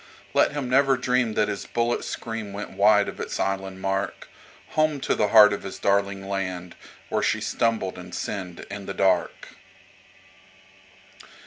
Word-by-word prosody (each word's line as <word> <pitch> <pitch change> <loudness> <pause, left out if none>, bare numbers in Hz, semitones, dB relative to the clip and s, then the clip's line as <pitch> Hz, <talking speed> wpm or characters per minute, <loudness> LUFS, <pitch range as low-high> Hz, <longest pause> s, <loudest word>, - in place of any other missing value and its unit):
Let - - +3
him 145 -3 -3
never 135 +1 +4
dream 125 -3 +1
that - - +2
his 100 - -4
bullet's 120 0 -1
scream 115 -3 -5
went 105 +1 -6
wide 105 +1 +4
of - - -7
its - - -4
island 95 -1 -2
mark, 95 0 -2 0.4
Home 155 -2 +1
to - - +1
the 105 - +1
heart 105 -1 +8
of 100 - -4
his 95 - -7
darling 100 -1 0
land 95 -3 -4 0.3
where - - 0
she - - +1
stumbled 115 -6 -1
and 90 0 -10
sinned 90 -4 -5
in 100 -1 -7
the 95 - -4
dark. 95 -3 +1
100 Hz, 155 wpm, -25 LUFS, 95-115 Hz, 0.4 s, heart